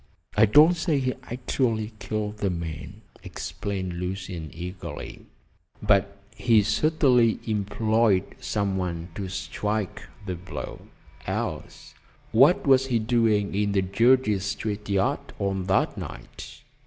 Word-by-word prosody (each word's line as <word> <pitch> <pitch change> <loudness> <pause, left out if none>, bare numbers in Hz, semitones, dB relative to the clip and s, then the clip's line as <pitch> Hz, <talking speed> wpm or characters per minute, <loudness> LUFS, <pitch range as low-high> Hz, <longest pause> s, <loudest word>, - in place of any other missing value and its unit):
"I 110 +2 +6
don't 150 - +7
say 160 -3 0
he 130 -1 0 0.2
actually 115 -3 -1
killed 105 +1 -3
the 100 -2 0
man," 85 -3 -6 0.2
explained 95 -3 -4
Lucian 90 -3 -5
eagerly, 90 +2 -7 0.5
"but 100 0 +2 0.2
he 110 0 +4
certainly 125 0 +3
employed 110 -1 +2 0.2
some 100 -2 -1
one 85 -2 -3
to 95 +1 -4
strike 100 +1 -3 0.2
the 95 - -3
blow, 90 +2 -7 0.4
else - - -4 0.4
what 135 +10 +5
was 135 -1 +5
he 125 -3 +2
doing 110 -3 +2
in 100 0 0
the 95 -1 +2
Jersey 115 +2 +3
Street 105 +1 -4
yard 100 -1 0
on 95 -2 -1
that 95 0 +1
night? - - -9
105 Hz, 120 wpm, -26 LUFS, 95-115 Hz, 0.5 s, don't